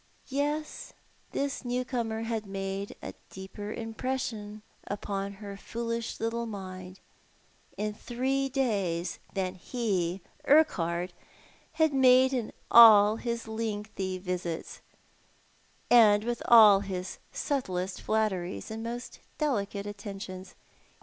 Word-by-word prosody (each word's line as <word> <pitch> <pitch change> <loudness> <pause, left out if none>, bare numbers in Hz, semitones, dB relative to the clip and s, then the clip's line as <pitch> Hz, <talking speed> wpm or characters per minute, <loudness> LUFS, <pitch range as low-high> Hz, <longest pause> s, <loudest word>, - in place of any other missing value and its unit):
Yes, 295 +3 -2 0.4
this 280 -1 -2
new 250 0 -1
comer 225 -3 -2
had 225 -2 -3
made 195 0 -4
a - - -6 0.2
deeper 190 +2 -8
impression 225 -2 -4 0.2
upon 200 -1 -3
her 200 0 -8
foolish 230 +2 -4
little 230 +1 -2
mind 185 -3 -8 0.8
in 210 0 -2
three 265 +5 -1
days 195 -10 -1 0.2
than 185 -2 -1
he, 190 -3 -2 0.2
Urquhart, 180 - +3 0.6
had 315 -2 +2
made 260 0 +5
in 240 -4 -2 0.2
all 215 -2 +9
his 235 -1 -4
lengthy 210 -4 -3
visits, 180 -3 -4 1.1
and 215 -3 +7
with 240 +1 -2
all 215 -4 +9
his 190 -2 -5
subtlest 190 - -2
flatteries 210 -4 -1
and 220 0 -5
most 240 +2 -6 0.2
delicate 205 -9 -1
attentions. 195 -2 -7
215 Hz, 105 wpm, -29 LUFS, 195-240 Hz, 1.1 s, all